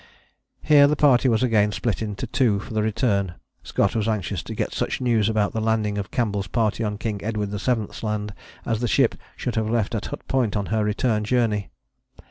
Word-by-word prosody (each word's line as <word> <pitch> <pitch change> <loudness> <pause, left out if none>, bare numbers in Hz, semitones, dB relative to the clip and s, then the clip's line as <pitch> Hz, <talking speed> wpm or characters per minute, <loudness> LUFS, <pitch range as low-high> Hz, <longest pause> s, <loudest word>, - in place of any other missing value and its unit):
Here 145 -2 +6
the 150 - +2
party 135 -3 +4
was 115 +1 +2
again 105 -4 +3
split 115 +1 -2
into 105 -2 -3
two 115 -7 +2
for 110 - -8
the 110 - +1
return. 105 -4 0 0.3
Scott 100 - 0
was 110 -1 0
anxious 105 -5 -1
to - - -7
get - - -2
such - - -2
news 115 -5 +2
about 110 -2 +1
the 110 - -1
landing 110 -2 0
of 95 - -4
Campbell's 105 -5 -1
party 115 +2 0
on 105 -1 -2
King 105 -2 -4
Edward 105 -1 -2
VII.'s 110 +1 -2
Land 105 -1 -3 0.3
as 115 -2 0
the 120 - 0
ship 125 +1 +3 0.2
should 125 - -3
have 110 -1 -1
left 115 -2 0
at 110 - -2
Hut - - -8
Point 120 -6 +1
on 100 - -1
her 110 -1 +2
return 105 +1 0
journey. 110 -3 0
110 Hz, 205 wpm, -23 LUFS, 105-120 Hz, 0.3 s, Here